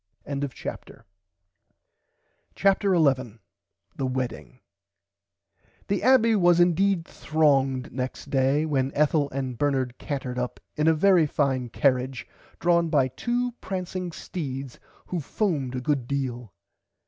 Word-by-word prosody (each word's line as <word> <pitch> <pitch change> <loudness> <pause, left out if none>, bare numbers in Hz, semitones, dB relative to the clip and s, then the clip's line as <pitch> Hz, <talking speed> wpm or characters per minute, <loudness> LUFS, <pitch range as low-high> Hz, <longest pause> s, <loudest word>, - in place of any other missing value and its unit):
[Pg 140 -1 -3
99] 140 -3 -6 1.5
CHAPTER 195 0 +3
11 130 -8 +2 0.6
THE 135 - -2
WEDDING 120 - -4 1.3
The 200 - 0
Abbey 240 -3 +5
was 175 -3 +4
indeed 175 0 +3
thronged 135 -6 +1
next 130 0 -5
day 135 +3 +2
when 135 -3 0
Ethel 150 -1 +2
and 130 -3 -4
Bernard 130 -4 0
cantered 130 -3 -4
up 125 0 -4 0.2
in 150 +1 +1
a 160 - +5
very 175 -1 +4
fine 135 -4 0
carrage 130 +1 0 0.3
drawn 170 -1 +2
by 140 -4 +3
two 245 - -1
prancing 185 -1 -4
steeds 135 -7 -6 0.3
who 180 - -3
foamed 150 - -2
a 125 - -3
good 135 -2 -1
deal. 125 -5 -3
140 Hz, 120 wpm, -26 LUFS, 130-175 Hz, 1.5 s, Abbey